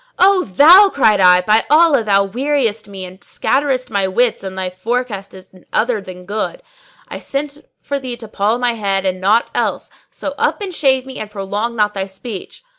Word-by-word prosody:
"O 375 0 +4
thou," 335 - +7
cried 220 - +2
I, 180 -1 +6
"by 215 +4 +3
Allah, 305 -5 +4
thou 200 -2 +3
weariest 235 -1 -1
me 195 -2 -8
and 185 +1 -13
scatterest 260 -3 -1
my 200 -2 +1
wits 225 +3 0
and 190 -1 -7
thy 185 -1 -3
forecast 205 0 -4
is 185 0 -15 0.2
other 225 -1 0
than 180 -1 -11
good; 215 - -4 0.4
I - - -7
sent 285 +1 -5 0.2
for 280 0 -3
thee 255 -3 -6
to 225 - -10
poll 210 +2 0
my 245 -1 0
head 195 -3 -1
and 185 0 -2
naught 215 +5 +2
else: - - -2 0.2
so - - -6
up - - 0
and 395 -3 -5
shave 265 -4 +2
me 265 -1 -8
and 215 - -6
prolong 210 +3 -4
not 210 -2 +1
thy 195 -1 -4
speech." 200 - -9
220 Hz, 190 wpm, -17 LUFS, 195-265 Hz, 0.4 s, thou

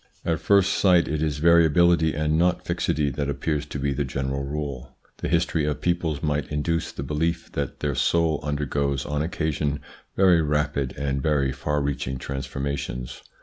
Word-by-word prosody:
At 80 -2 0
first 100 +1 +3
sight 90 -3 +4
it 75 -1 -2
is 75 -2 0
variability 85 0 +4
and 75 +1 +1
not 90 +2 +2
fixity 75 -1 0
that 70 +2 -2
appears 75 +1 -2
to - - -5
be 70 0 0
the 70 +1 -1
general 70 +1 -3
rule. 70 -3 -5 0.2
The - - -3
history 85 -2 +1
of 75 -1 -1
peoples 85 -4 -1
might 75 -1 -1
induce 75 +2 -1
the - - -6
belief 80 +4 -2
that 70 -2 -4
their 75 -1 0
soul 80 +2 +2
under 75 0 -2
goes 70 -1 -1
on 75 0 -1
occasion 75 -3 -1 0.4
very 90 -3 +5
rapid 75 -3 -1
and 70 -1 -1
very 70 -2 +1
far 75 +2 -1
reaching 65 -2 -2
transformations. 70 -2 -4
75 Hz, 170 wpm, -25 LUFS, 70-80 Hz, 0.4 s, very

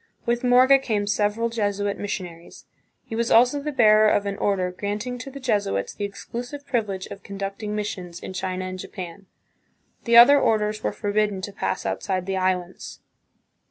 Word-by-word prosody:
With 235 +1 0
Morga 255 +2 +6
came 215 -6 -1
several 210 +3 0
Jesuit 205 -3 -1
missionaries. 180 -4 -7 0.4
He 225 - -6
was 235 +1 0
also 250 +5 +4
the 300 +1 -3
bearer 215 -5 +5
of 205 - +1
an 200 0 -2
order 190 -4 0
granting 210 +6 -4
to 260 - -7
the 275 +1 -9
Jesuits 205 - -1
the 205 -1 -4
exclu 235 +4 -7
sive 285 +3 -9
privilege 210 -8 -2
of 200 - -8
conducting 200 +2 -5
missions 185 -5 -5
in 190 - -8
China 185 0 -3
and 185 0 -6
Japan. 185 +1 -8 0.8
The 235 -1 +5
other 280 +4 +9
orders 215 -1 +1
were - - -1
forbidden 205 -1 -1
to 200 +1 -6
pass 185 - -3
outside 185 -2 -2
the 195 0 -2
Islands. 185 -1 -2
205 Hz, 170 wpm, -24 LUFS, 190-235 Hz, 0.8 s, other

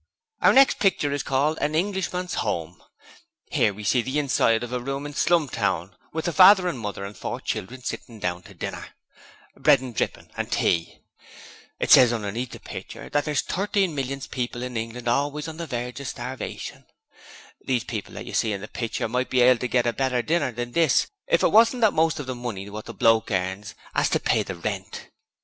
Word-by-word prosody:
'Our - - +6
next 270 0 +5
picture 185 -7 +2
is 145 0 -1
called 145 +4 0
"An 150 +2 0
Englishman's 180 0 -1
Home". 90 -4 -3 0.7
'Ere - - +3
we 105 +1 -9
see 125 +4 +3
the 130 +5 -3
inside 120 -5 +2
of 120 +1 -6
another 125 -1 -2
room 135 +2 -3
in 145 - -6
Slumtown, 115 - +1 0.2
with 160 0 -3
the 170 - -1
father 185 0 +7
and 145 -8 -2
mother 100 -2 -5
and 100 +1 -8
four - - -4
children 125 +7 -5
sitting 115 -2 -6
down 90 -2 -2
to - - -15
dinner - - -6 0.6
bread - - +5
and 130 -2 -7
drippin' - - -3
and - - -4
tea. 85 -1 0 0.8
It - - -1
ses 125 -3 +8
underneath 115 +2 -3
the - - -10
pitcher - - -9
that 145 0 +1
there's 150 -2 0
Thirteen 195 -2 0
millions 135 -1 -3
of - - -20
people 125 -1 -3
in 125 -1 -5
England 115 +2 -4
always 145 +5 0
on 160 -1 -7
the 170 -1 -5
verge 125 -1 -4
of 140 - -6
starvation. 125 +2 -6 0.8
These 125 -3 0
people 110 -4 -6
that - - -7
you - - -8
see 110 -2 +1
in 100 - -4
the 105 - -7
pitcher 115 -1 -3
might 125 +3 -1
be 130 - +3
able 125 0 +6
to 125 - -1
get 120 0 +1
a 120 - +1
better 130 -2 0
dinner 150 -1 +1
than 120 +1 -5
this 160 -1 +3 0.2
if - - +2
it - - +5
wasn't 230 +3 +5
that 220 -2 +5
most 160 -1 +2
of 145 - -4
the 130 - -3
money 120 -6 -5
wot 105 +1 -7
the 115 - -8
bloke 115 +2 +3
earns 95 +1 -2 0.2
'as - - +2
to - - +1
pay - - +2
the 95 - -5
rent. 100 +2 -5
125 Hz, 210 wpm, -25 LUFS, 110-150 Hz, 0.8 s, ses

